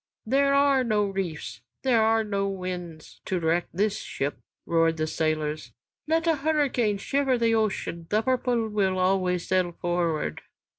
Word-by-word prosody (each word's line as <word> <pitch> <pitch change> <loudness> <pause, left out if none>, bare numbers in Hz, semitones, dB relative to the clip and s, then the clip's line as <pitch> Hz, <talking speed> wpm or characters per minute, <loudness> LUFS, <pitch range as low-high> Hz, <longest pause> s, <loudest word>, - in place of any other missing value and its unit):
"There 275 +4 +3
are 280 -2 +4
no 215 -3 +1
reefs, 175 - -4 0.2
there 245 -4 +3
are 225 0 +3
no 200 -2 -1
winds 180 -4 -6
to 185 - -1
wreck 165 +1 +1
this 205 +3 0
ship," 140 +1 -4 0.3
roared 165 -1 +2
the 155 - 0
sailors. 155 -4 -2 0.3
"Let 325 +1 +1
a 325 -2 +2
hurricane 275 -8 +1
shiver 270 +4 +1
the 230 -1 +2
ocean, 195 -6 -1
'The 215 +1 +2
Purple' 245 -2 +1
will 195 -3 +1
always 185 -1 +1
sail 185 -2 +1
forward." 170 - -1
195 Hz, 150 wpm, -26 LUFS, 170-240 Hz, 0.3 s, are